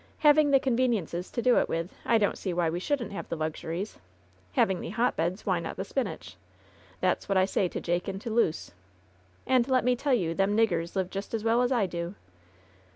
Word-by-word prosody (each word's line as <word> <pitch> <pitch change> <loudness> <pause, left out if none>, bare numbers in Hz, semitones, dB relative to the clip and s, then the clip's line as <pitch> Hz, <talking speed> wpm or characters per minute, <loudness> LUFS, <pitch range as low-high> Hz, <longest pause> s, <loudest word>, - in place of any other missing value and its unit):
Having 295 0 +6
the 275 -1 +5
conveniences 230 - 0
to 235 - -3
do 250 -1 +5
it - - -1
with, 165 +2 -3
I 230 - +5
don't 205 -2 +1
see 185 -3 -4
why 170 -2 +1
we 175 - -2
shouldn't 255 +4 -2
have 200 - -6
the - - -2
luxuries. 160 +5 -4 0.5
Having 190 - +2
the - - -5
hotbeds, 195 -4 -1
why 185 -3 +1
not 165 - -5
the 190 - -3
spinach? 270 +5 -4 0.6
That's - - 0
what 195 - +2
I 185 - +5
say 190 -1 0
to - - -5
Jake 175 +1 -1
and 195 0 -3
to 230 - -5
Luce. 215 -8 0 0.7
And 255 -2 +3
let 255 -3 +2
me 250 0 +3
tell 270 +1 +1
you 170 -8 -1
them 195 +4 +1
niggers 175 -6 +1
live 185 -1 -1
just 200 +3 -4
as 220 - -3
well 230 +2 +3
as 250 +1 +1
I 235 -6 +3
do." 170 +1 -5
200 Hz, 215 wpm, -28 LUFS, 175-240 Hz, 0.7 s, Having